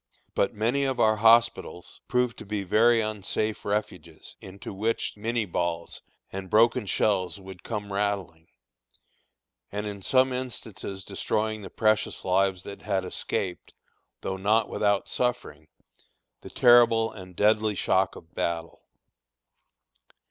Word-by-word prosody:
But 100 Hz, -, 0 dB
many 120 Hz, +6 st, +1 dB
of 135 Hz, -2 st, -1 dB
our 110 Hz, 0 st, +4 dB
hospitals 115 Hz, -5 st, +2 dB
proved 125 Hz, -1 st, 0 dB
to -, -, -8 dB
be 105 Hz, -1 st, -2 dB
very 115 Hz, +5 st, +4 dB
unsafe 110 Hz, 0 st, -2 dB
refuges, 90 Hz, -6 st, -4 dB
into 95 Hz, +2 st, -9 dB
which 110 Hz, +4 st, -1 dB
Minié 110 Hz, -2 st, -2 dB
balls 85 Hz, -1 st, -2 dB, 0.3 s
and 95 Hz, -1 st, -6 dB
broken 115 Hz, +1 st, +3 dB
shells 95 Hz, -1 st, 0 dB
would 95 Hz, -2 st, -11 dB
come 105 Hz, -3 st, -5 dB
rattling, 100 Hz, -5 st, -2 dB, 1.2 s
and 105 Hz, +1 st, -3 dB
in 100 Hz, -1 st, -6 dB
some 130 Hz, +5 st, +3 dB
instances 110 Hz, -6 st, -6 dB
destroying 110 Hz, +4 st, -2 dB
the 95 Hz, -, -8 dB
precious 110 Hz, -1 st, 0 dB
lives 95 Hz, 0 st, +1 dB
that 100 Hz, -, -9 dB
had 95 Hz, -2 st, -1 dB
escaped 90 Hz, 0 st, -4 dB, 0.5 s
though 95 Hz, -, -3 dB
not 105 Hz, +4 st, +2 dB
without 100 Hz, -1 st, +1 dB
suffering 125 Hz, -11 st, -2 dB, 0.7 s
the -, -, -10 dB
terrible 115 Hz, -2 st, +5 dB
and 90 Hz, -3 st, -11 dB
deadly 105 Hz, +1 st, +2 dB
shock 95 Hz, 0 st, +1 dB
of 80 Hz, -, -14 dB
battle. 85 Hz, -1 st, -3 dB
105 Hz, 125 wpm, -27 LUFS, 95-115 Hz, 1.2 s, terrible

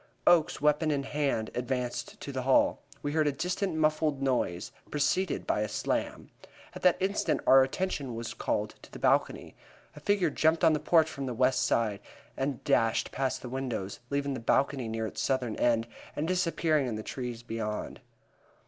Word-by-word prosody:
Oakes, 165 Hz, -3 st, +4 dB
weapon 150 Hz, +2 st, +2 dB
in 145 Hz, -2 st, 0 dB
hand, 135 Hz, -6 st, -1 dB
advanced 125 Hz, 0 st, -3 dB
to 140 Hz, -, -5 dB
the 130 Hz, -1 st, -3 dB
hall. 130 Hz, +1 st, +3 dB, 0.2 s
We 145 Hz, -, -1 dB
all 155 Hz, -, -2 dB
heard 155 Hz, -1 st, +3 dB
a -, -, +3 dB
distant 180 Hz, +5 st, -2 dB
muffled 155 Hz, -2 st, +1 dB
noise, 125 Hz, -10 st, -1 dB, 0.2 s
preceded 150 Hz, +4 st, 0 dB
by -, -, 0 dB
a 105 Hz, -, -1 dB
slam. -, -, -2 dB, 0.4 s
At -, -, -8 dB
that 180 Hz, -2 st, +4 dB
instant 195 Hz, +2 st, 0 dB
our 135 Hz, 0 st, +8 dB
attention 135 Hz, -3 st, -2 dB
was 115 Hz, 0 st, -5 dB
called -, -, -2 dB
to -, -, -15 dB
the -, -, -8 dB
balcony. -, -, +1 dB, 0.4 s
A -, -, -9 dB
figure 185 Hz, 0 st, +1 dB
jumped 160 Hz, +3 st, +2 dB
on 160 Hz, -1 st, +6 dB
the 150 Hz, -, +1 dB
porch 160 Hz, 0 st, +4 dB
from 140 Hz, -3 st, -5 dB
the 125 Hz, -, -3 dB
west 130 Hz, +1 st, +2 dB
side 110 Hz, -4 st, +1 dB, 0.4 s
and 135 Hz, -1 st, -2 dB
dashed 115 Hz, -1 st, +2 dB
past 135 Hz, -1 st, -2 dB
the -, -, -5 dB
windows, 125 Hz, -7 st, -4 dB
leaving 140 Hz, 0 st, -1 dB
the 130 Hz, -, -4 dB
balcony 130 Hz, +2 st, +1 dB
near 110 Hz, 0 st, -2 dB
its -, -, -4 dB
southern 125 Hz, -4 st, 0 dB
end, 115 Hz, -1 st, +2 dB, 0.3 s
and 150 Hz, +2 st, -1 dB
disappearing 165 Hz, -5 st, +1 dB
in 115 Hz, -, -2 dB
the 110 Hz, -, -5 dB
trees 120 Hz, -2 st, -5 dB
beyond. 110 Hz, -3 st, -4 dB
135 Hz, 185 wpm, -29 LUFS, 120-155 Hz, 0.4 s, our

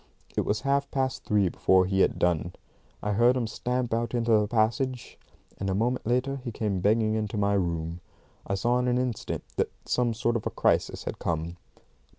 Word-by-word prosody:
It -, -, 0 dB
was 105 Hz, -, 0 dB
half 140 Hz, 0 st, +1 dB
past 130 Hz, -1 st, -2 dB
three 105 Hz, -2 st, +3 dB
before 95 Hz, +1 st, +3 dB
he 95 Hz, +1 st, 0 dB
had -, -, +3 dB
done. 85 Hz, 0 st, +1 dB, 0.5 s
I 105 Hz, -, 0 dB
heard 120 Hz, +5 st, +4 dB
him 120 Hz, -, 0 dB
stamp 125 Hz, +2 st, -2 dB
out 115 Hz, +1 st, -1 dB
into 115 Hz, -1 st, +1 dB
the 105 Hz, -1 st, +4 dB
passage, 120 Hz, +3 st, 0 dB, 0.4 s
and 95 Hz, -, -2 dB
a 95 Hz, -, 0 dB
moment 120 Hz, +3 st, 0 dB
later 125 Hz, +3 st, +1 dB
he 120 Hz, -, -4 dB
came 105 Hz, -3 st, -1 dB
banging 110 Hz, +2 st, +3 dB
into 110 Hz, -1 st, -2 dB
my 100 Hz, 0 st, +2 dB
room. 85 Hz, -3 st, -1 dB, 0.5 s
I 100 Hz, -, 0 dB
saw 120 Hz, +6 st, +1 dB
in 125 Hz, -, 0 dB
an 125 Hz, 0 st, +2 dB
instant 125 Hz, -3 st, -2 dB
that -, -, +1 dB, 0.2 s
some 120 Hz, -2 st, +1 dB
sort 120 Hz, +1 st, 0 dB
of 110 Hz, -, -4 dB
a -, -, 0 dB
crisis -, -, +1 dB
had -, -, -5 dB
come. 85 Hz, 0 st, -2 dB
110 Hz, 195 wpm, -27 LUFS, 100-125 Hz, 0.5 s, heard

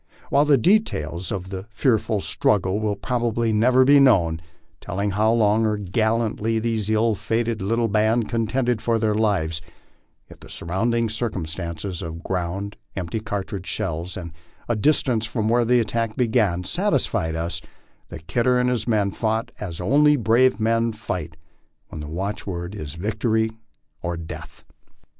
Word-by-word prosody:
While 145 Hz, +1 st, +4 dB
the 145 Hz, -2 st, +5 dB
details 95 Hz, -, +1 dB
of 95 Hz, -2 st, -4 dB
that 95 Hz, +1 st, -6 dB
fearful 110 Hz, -2 st, +1 dB
struggle 95 Hz, 0 st, +1 dB
will 105 Hz, -1 st, -1 dB
probably 115 Hz, +1 st, -1 dB
never 125 Hz, +4 st, +4 dB
be 140 Hz, +1 st, +7 dB
known, 85 Hz, -12 st, +4 dB, 0.4 s
telling 100 Hz, +3 st, -2 dB
how 105 Hz, +3 st, +2 dB
long 110 Hz, -1 st, +3 dB
and 105 Hz, -4 st, -3 dB
gallantly 115 Hz, 0 st, +1 dB
this 110 Hz, -2 st, -1 dB
ill 110 Hz, +1 st, +3 dB
fated 115 Hz, +1 st, -1 dB
little 115 Hz, +4 st, +1 dB
band 110 Hz, +2 st, +2 dB
contended 120 Hz, 0 st, 0 dB
for 115 Hz, 0 st, +1 dB
their 110 Hz, -1 st, +1 dB
lives, 95 Hz, -7 st, 0 dB, 0.7 s
yet -, -, -15 dB
the -, -, -13 dB
surrounding 115 Hz, +7 st, 0 dB
circumstances 90 Hz, -5 st, -4 dB
of 85 Hz, 0 st, -6 dB
ground, 95 Hz, +3 st, -3 dB, 0.2 s
empty 95 Hz, +4 st, -3 dB
cartridge 100 Hz, -3 st, -5 dB
shells, 85 Hz, +1 st, -3 dB
and 85 Hz, -3 st, -6 dB, 0.5 s
distance 125 Hz, -6 st, +2 dB
from 110 Hz, -1 st, -1 dB
where 120 Hz, +1 st, +3 dB
the 125 Hz, +1 st, +4 dB
attack 115 Hz, 0 st, -1 dB
began, 110 Hz, -7 st, +1 dB
satisfied 80 Hz, -2 st, 0 dB
us 80 Hz, 0 st, -2 dB, 0.5 s
that 80 Hz, -, -9 dB
Kidder 125 Hz, +6 st, +2 dB
and 125 Hz, 0 st, +2 dB
his 115 Hz, -2 st, -1 dB
men 105 Hz, -4 st, +2 dB
fought 110 Hz, +2 st, -1 dB
as 90 Hz, -6 st, -5 dB
only 145 Hz, +10 st, +4 dB
brave 120 Hz, +1 st, +3 dB
men 115 Hz, +1 st, +1 dB
fight 90 Hz, -7 st, -5 dB, 0.5 s
when 80 Hz, -, -7 dB
the 75 Hz, -, -7 dB
watchword 90 Hz, 0 st, -4 dB
is 75 Hz, -7 st, -6 dB
victory 110 Hz, +4 st, 0 dB, 0.5 s
or 85 Hz, 0 st, -3 dB
death. 85 Hz, -1 st, -9 dB
110 Hz, 150 wpm, -23 LUFS, 95-115 Hz, 0.7 s, be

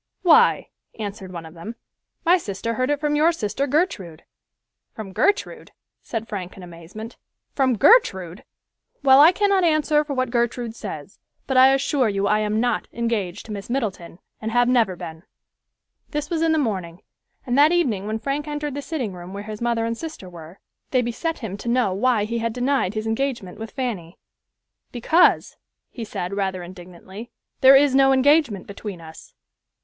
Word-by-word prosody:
"Why," 455 Hz, +7 st, +4 dB, 0.3 s
answered 200 Hz, -3 st, -6 dB
one 170 Hz, -2 st, -7 dB
of 160 Hz, -, -12 dB
them, 175 Hz, +8 st, -8 dB, 0.5 s
"my 355 Hz, +2 st, +5 dB
sister 210 Hz, -, -4 dB
heard 255 Hz, +3 st, -1 dB
it 290 Hz, -1 st, 0 dB
from 295 Hz, 0 st, 0 dB
your 310 Hz, +3 st, +4 dB
sister 275 Hz, -2 st, -2 dB
Gertrude." 225 Hz, -, -1 dB, 0.7 s
"From 205 Hz, -4 st, -8 dB
Gertrude!" 405 Hz, -, -1 dB, 0.3 s
said 225 Hz, -1 st, -5 dB
Frank 190 Hz, -4 st, -6 dB
in 190 Hz, -, -10 dB
amazement, 175 Hz, +7 st, -10 dB, 0.4 s
"from 260 Hz, -4 st, +1 dB
Gertrude! 190 Hz, -, +3 dB, 0.6 s
Well, 270 Hz, 0 st, +7 dB
I 315 Hz, +4 st, +8 dB
cannot 395 Hz, 0 st, +2 dB
answer 310 Hz, -2 st, +2 dB
for 290 Hz, -2 st, -5 dB
what 255 Hz, -1 st, -1 dB
Gertrude 235 Hz, -1 st, -1 dB
says, -, -, -8 dB, 0.3 s
but 265 Hz, -, -2 dB
I 260 Hz, +1 st, +7 dB
assure 270 Hz, -2 st, +1 dB
you 200 Hz, 0 st, -1 dB
I 210 Hz, +1 st, +2 dB
am 215 Hz, 0 st, 0 dB
not 245 Hz, +1 st, 0 dB
engaged 215 Hz, -5 st, -3 dB
to 220 Hz, -, -9 dB
Miss 200 Hz, 0 st, -7 dB
Middleton, 210 Hz, -10 st, -3 dB, 0.2 s
and 220 Hz, +1 st, -3 dB
have 245 Hz, +1 st, +3 dB
never 235 Hz, -7 st, +2 dB
been." 160 Hz, -2 st, -9 dB, 0.9 s
This 295 Hz, +1 st, -4 dB
was 330 Hz, -2 st, -1 dB
in 330 Hz, -1 st, +2 dB
the 320 Hz, -, +2 dB
morning, 190 Hz, -, -3 dB, 0.4 s
and 245 Hz, -2 st, -1 dB
that 300 Hz, +2 st, +6 dB
evening 235 Hz, -, 0 dB
when 215 Hz, +1 st, -2 dB
Frank 280 Hz, +5 st, -3 dB
entered 295 Hz, -1 st, -4 dB
the 285 Hz, -, -4 dB
sitting 275 Hz, -, -4 dB
room 180 Hz, +1 st, -10 dB
where 200 Hz, +1 st, -6 dB
his 215 Hz, 0 st, -8 dB
mother 235 Hz, -1 st, 0 dB
and 230 Hz, 0 st, -2 dB
sister 315 Hz, -, -8 dB
were, 170 Hz, +1 st, -12 dB, 0.3 s
they 255 Hz, -2 st, +1 dB
beset 250 Hz, +8 st, -3 dB
him 200 Hz, -2 st, -5 dB
to 235 Hz, -, -5 dB
know 240 Hz, -5 st, +1 dB
why 220 Hz, +2 st, +1 dB
he 230 Hz, +2 st, -3 dB
had 230 Hz, 0 st, -2 dB
denied 250 Hz, -5 st, 0 dB
his 215 Hz, 0 st, -3 dB
engagement 225 Hz, -4 st, -3 dB
with 225 Hz, 0 st, -6 dB
Fanny. 210 Hz, -, -5 dB, 0.7 s
"Because," 315 Hz, +9 st, +2 dB, 0.5 s
said 195 Hz, -4 st, -5 dB
he, -, -, -4 dB
rather 190 Hz, -2 st, -2 dB
indignantly, 185 Hz, +5 st, -11 dB, 0.3 s
"there 265 Hz, +1 st, +8 dB
is 280 Hz, 0 st, +4 dB
no 270 Hz, 0 st, +5 dB
engagement 265 Hz, -, +3 dB
between 200 Hz, -2 st, -8 dB
us." 160 Hz, -1 st, -13 dB
230 Hz, 175 wpm, -22 LUFS, 195-275 Hz, 0.9 s, I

